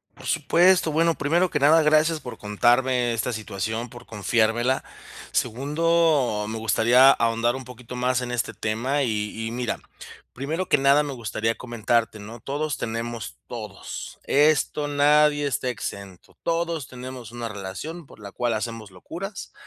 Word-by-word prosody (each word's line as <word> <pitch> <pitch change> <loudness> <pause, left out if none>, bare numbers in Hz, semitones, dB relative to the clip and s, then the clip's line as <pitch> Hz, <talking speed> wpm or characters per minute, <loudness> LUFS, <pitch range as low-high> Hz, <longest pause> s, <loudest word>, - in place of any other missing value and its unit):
Por - - -12
supuesto, 180 -1 +4
bueno, 165 +2 +2
primero 170 +6 +1
que 150 - -1
nada, 155 +4 +6
gracias 155 +1 +3
por 125 - -8
contarme 120 +3 +2
esta 115 +2 -1
situación, 110 +2 -4
por 120 +1 -12
confiármela, 115 +4 +1 0.5
segundo, 145 -2 +1
me 110 +1 -4
gustaría 120 +5 +5
ahondar 115 +1 +1
un 130 - -5
poquito 125 0 -10
más 125 0 +1
en 125 -1 -4
este 120 -1 -1
tema 125 +6 -1
y 110 -1 -2
y - - -3
mira, 120 -1 -2 0.5
primero 155 +8 -3
que - - +5
nada 140 +1 +4
me 145 - -4
gustaría 115 -2 -2
comentarte, 115 -2 -1
¿no? 110 +3 -10
Todos 145 +3 -3
tenemos 115 0 -4
todos. 105 -5 -7
Esto, 150 0 +2
nadie 145 0 +4
está 130 -1 -1
exento. 100 -6 -7
Todos 165 -3 -1
tenemos 125 -2 -8
una 120 -1 -5
relación 110 - -7
por - - -16
la 100 -2 -10
cual 120 +1 -1
hacemos 110 -1 -4
locuras 175 - -8
125 Hz, 150 wpm, -24 LUFS, 115-145 Hz, 0.5 s, nada